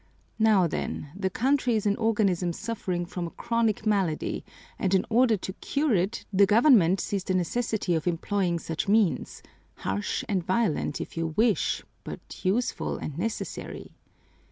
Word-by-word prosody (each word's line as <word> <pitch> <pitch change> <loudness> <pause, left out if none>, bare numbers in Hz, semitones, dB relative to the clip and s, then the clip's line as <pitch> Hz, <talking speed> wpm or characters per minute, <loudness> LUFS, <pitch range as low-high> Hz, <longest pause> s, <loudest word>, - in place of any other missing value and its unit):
Now 215 -4 +5
then, 150 -2 -3
the 190 -1 -1
country 250 +3 +1
is 215 - -1
an 205 -1 +3
organism 200 -6 +1
suffering 185 -4 -3
from 175 0 -4
a - - -6
chronic 230 0 -1
malady, 195 -7 0 0.4
and 190 0 +2
in 190 - +2
order 230 -1 +4
to 190 0 -6
cure 285 +5 0
it, 195 +4 0
the 195 +1 +5
government 205 - +5
sees 195 +1 -2
the 185 - -1
necessity 200 +1 0
of 160 0 -1
employing 175 +1 0
such 165 +1 -4
means, 205 -3 +1 0.3
harsh 100 +2 -2
and 190 -4 0
violent 185 -6 0
if - - -6
you 165 -1 -2
wish, 220 -2 +2 0.2
but - - -9
useful 215 +7 0
and 150 +1 -6
necessary." 225 +4 -5
195 Hz, 155 wpm, -27 LUFS, 175-225 Hz, 0.4 s, Now